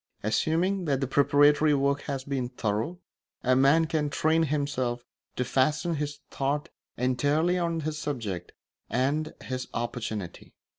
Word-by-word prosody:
Assuming 175 - +1
that 140 -4 +1
the 135 - 0
preparatory 145 +2 +4
work 140 +1 +1
has 135 -2 -2
been 135 -3 -2
thorough, 115 +7 -2 0.5
a 130 0 +4
man 140 +5 +5
can 155 -2 0
train 160 +3 +2
himself 140 -5 -1 0.3
to 125 - -1
fasten 150 +7 +1
his 145 0 -4
thought 140 +2 -1 0.3
entirely 145 +8 +2
on 170 -1 -1
his 155 0 -3
subject 115 -11 -4 0.4
and 140 +6 0
his 130 0 -4
opportunity. 110 -6 -4
140 Hz, 135 wpm, -28 LUFS, 125-155 Hz, 0.5 s, man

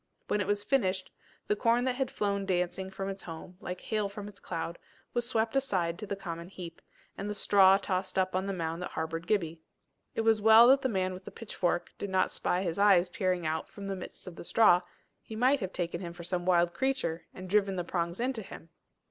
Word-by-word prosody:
When 210 - +2
it 190 - -2
was 205 0 0
finished, 190 -8 0 0.3
the 210 - +1
corn 230 +3 +2
that 255 0 +1
had 260 0 -1
flown 200 -1 -1
dancing 185 +1 -1
from 195 0 -5
its 195 0 -5
home, 170 +2 -9
like 180 0 -5
hail 215 -2 -1
from 200 0 -7
its 205 -1 -12
cloud, 170 0 -4 0.3
was 240 -1 0
swept 225 +1 0
aside 185 -11 0
to 210 - -6
the 200 - -2
common 170 -3 -6
heap, 175 -3 -9 0.4
and 200 +1 -3
the 210 - -3
straw 195 -1 +6
tossed 190 -1 -2
up 185 -1 +1
on 190 +1 0
the - - -1
mound 165 -2 -3
that 180 - -4
harboured 165 +1 -4
Gibbie. 165 -6 0 0.5
It - - +1
was 225 -1 +3
well 220 +2 +8
that 270 +1 +6
the 260 - 0
man 185 -3 0
with 185 +1 -10
the - - -6
pitchfork 180 -6 -2
did 200 - -3
not 190 -1 +2
spy 180 +2 0
his 170 0 -2
eyes 190 -3 +5
peering 180 -3 -1
out 155 0 -2
from 200 - -9
the 195 0 -2
midst 185 - -9
of 180 -3 -9
the - - -7
straw: 180 -2 +5 0.4
he 220 - -9
might 255 +5 +3
have 190 -3 -3
taken 170 -1 -3
him 170 -2 -6
for 175 0 -9
some 175 0 -3
wild 175 -1 +4
creature, 265 -11 -1
and 185 0 -9
driven 195 0 +2
the 180 - -1
prongs 170 +1 -2
into 250 -1 -1
him. 165 -4 -11
190 Hz, 230 wpm, -30 LUFS, 175-210 Hz, 0.5 s, well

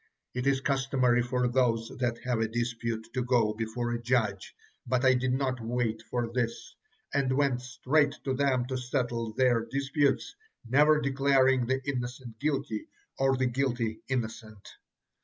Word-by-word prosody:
It 125 +2 -2
is 135 -1 +2
customary 135 -3 +2
for 125 +1 0
those 120 -2 +1
that 120 -2 0
have 125 -2 0
a 110 - +1
dispute 115 -1 -3
to 130 - 0
go 120 -4 +2
before 115 +2 -3
a 120 0 -2
judge, 115 -5 0 0.3
but 130 +1 +1
I 130 - +6
did 130 0 0
not 130 -1 -1
wait 115 -1 -1
for 120 -1 -2
this, 125 - -2 0.4
and 130 -2 +1
went 135 -4 +2
straight 135 +4 +1
to 135 - -1
them 130 -2 +1
to 130 0 -3
settle 120 -3 -2
their 120 -2 +3
disputes, 140 - 0 0.3
never 150 +5 +5
declaring 135 -3 +3
the 130 +1 0
innocent 125 -3 -4
guilty, 145 - -2 0.3
or 135 0 +3
the 130 - +1
guilty 120 -3 -1
innocent." 110 -4 -4
125 Hz, 155 wpm, -29 LUFS, 115-135 Hz, 0.4 s, I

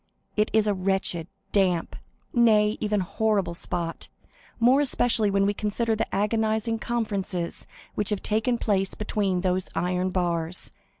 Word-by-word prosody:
It 210 0 +2
is 220 -1 +3
a 210 - +2
wretched, 185 -3 -1 0.2
damp, 185 -4 +1 0.4
nay, 215 -3 +4
even 210 -2 0
horrible 195 -1 0
spot, 170 -1 -3 0.5
more 250 +5 +5
especially 245 -6 +2
when 195 0 +2
we 205 - +2
consider 220 +2 -1
the 220 - -1
agonizing 220 +2 0
conferences 200 -7 -3 0.3
which 210 - 0
have 210 -2 -1
taken 220 +3 +1
place 195 -4 0
between 200 -4 -1
those 185 0 0
iron 180 +1 0
bars. 175 -2 -2
205 Hz, 135 wpm, -26 LUFS, 185-220 Hz, 0.5 s, more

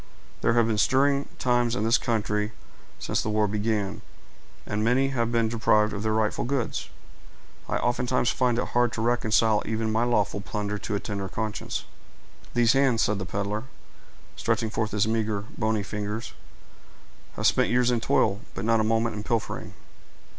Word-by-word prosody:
There 115 - +3
have 120 -1 +4
been 110 -2 0
stirring 140 +6 +2
times 120 -1 +1
in 115 - -1
this 115 +2 +4
country 105 -1 -1 0.4
since - - -1
the - - -3
war 105 0 +2
began, 105 0 -1 0.6
and 105 0 -2
many 130 +4 +3
have 120 -3 -1
been 115 -1 +2
deprived 110 -2 +2
of 105 - -4
their 110 0 0
rightful 110 -1 0
goods 125 -1 -2 0.8
I - - +1
oftentimes 125 0 +1
find 125 -2 +1
it - - -1
hard 120 -1 +2
to 110 - -3
reconcile 110 -2 +2
even 110 0 -1
my 110 +2 +2
lawful 105 -4 +1
plunder 105 0 -3
to 105 - -3
a - - 0
tender 100 -2 -4
conscience." 110 +1 -3 0.7
"These 120 -1 +4
hands," 135 -4 +3
said 105 -1 0
the 95 - -4
peddler, 105 +4 -3 0.7
stretching 110 -1 -1
forth 110 -1 -1
his 105 0 +1
meager, 110 -2 0
bony 110 -2 0
fingers, 105 +2 -4 1.0
"have - - -3
spent - - +3
years 125 0 +3
in 120 -2 +1
toil, 100 -2 +2
but - - -4
not 115 0 +3
a - - +2
moment 115 +1 +1
in 105 - -4
pilfering." 115 0 -3
110 Hz, 170 wpm, -26 LUFS, 105-120 Hz, 1.0 s, have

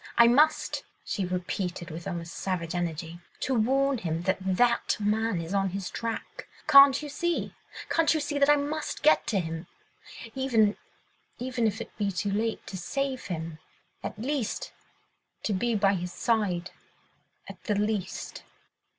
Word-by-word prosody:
I 235 - +9
must!" 295 +6 +3 0.2
she 195 - -1
repeated 180 -1 -3
with 165 +4 -7
almost 170 -2 -5
savage 175 -3 -3
energy, 170 -1 -3 0.2
"to 265 - 0
warn 265 +3 +2
him 165 -2 -2
that 190 +1 +1
that 235 +6 +2
man 215 -1 +1
is 165 +3 -5
on 195 -1 +2
his 190 0 -4
track.... 230 -1 -5 0.2
Can't 275 +1 +8
you - - -4
see—can't 330 +1 -1
you 315 - +2
see, 290 -1 -2
that 280 +1 +5
I 295 - +8
must 295 +2 -3
get 310 - +5
to 205 - +1
him... 165 0 -4 0.7
even... 230 -6 +3 0.6
even 245 -2 0
if 215 +1 -2
it - - -9
be 200 -1 +1
too 200 +2 -2
late 220 +2 -1
to 190 - -6
save 265 +8 -2
him... 165 -3 -5 0.4
at - - -5
least... 255 -1 -2 0.7
to 215 - 0
be 230 +5 +1
by 200 -1 +3
his 180 -1 -3
side... 195 -7 0 0.8
at - - -11
the 210 - +1
last." 210 -2 -2
210 Hz, 155 wpm, -28 LUFS, 180-260 Hz, 0.8 s, I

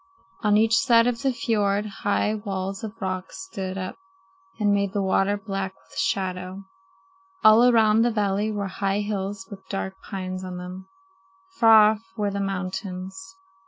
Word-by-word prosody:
On 210 -1 +3
each 225 +1 +4
side 230 -3 +5
of 240 -1 0
the 270 - +2
fiord 210 -5 0 0.2
high 205 +1 +1
walls 195 -2 -4
of 220 +1 -7
rock 185 -2 -3
stood 185 - -6
up 185 -1 -5 0.6
and 205 -1 +3
made 200 -1 0
the 205 - 0
water 195 +1 +2
black 195 -2 -4
with 165 - -11
shadow. 185 0 -2 0.8
All 215 +3 +8
around 220 -2 +4
the 240 - +3
valley 210 -1 0
were 205 -1 -2
high 195 +1 -1
hills 200 -1 -4
with 190 -1 -11
dark 195 -1 -3 0.2
pines 185 -2 -4
on 185 -1 -6
them. 180 +1 -8 0.6
Far 220 - +7
off 220 -1 -5 0.2
were 205 -1 0
the 200 - -3
mountains. 190 - -5
200 Hz, 160 wpm, -25 LUFS, 190-215 Hz, 0.8 s, All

